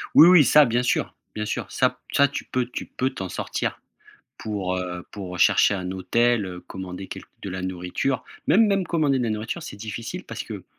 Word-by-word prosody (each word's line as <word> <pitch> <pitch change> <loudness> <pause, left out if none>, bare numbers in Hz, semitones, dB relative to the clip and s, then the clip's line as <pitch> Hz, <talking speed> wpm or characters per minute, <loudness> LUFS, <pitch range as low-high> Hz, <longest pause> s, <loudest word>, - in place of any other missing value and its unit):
Oui, 165 - +10
oui, 180 -4 +8
ça, 150 +2 +7
bien 120 +1 +1
sûr. 125 - 0 0.2
Bien 105 0 -2
sûr, - - -3
ça - - +2
p - - -23 0.2
ça 140 0 +5
tu 140 - -5
peux 125 -1 -1
tu 125 - -6
peux 130 +1 -1
t'en 95 -7 -5
sortir - - -3 0.6
pour, 95 -4 -3
heu, 90 -1 -5
pour 90 -3 -7
chercher - - +5
un 90 -2 -3
hôtel, 115 +3 +1
heu, 90 -1 -7
commander 95 0 -7
quelqu - - -9
de 100 - -5
la 95 0 -4
nourriture, 95 +8 -2 0.2
même 210 +7 +5
même 195 -2 +1
commander 150 -5 +1
de - - 0
la 115 - 0
nourriture, 110 +10 -3
c'est 100 - -8
difficile 110 +2 -6
parce - - -6
que, - - -8
110 Hz, 210 wpm, -24 LUFS, 95-135 Hz, 0.6 s, Oui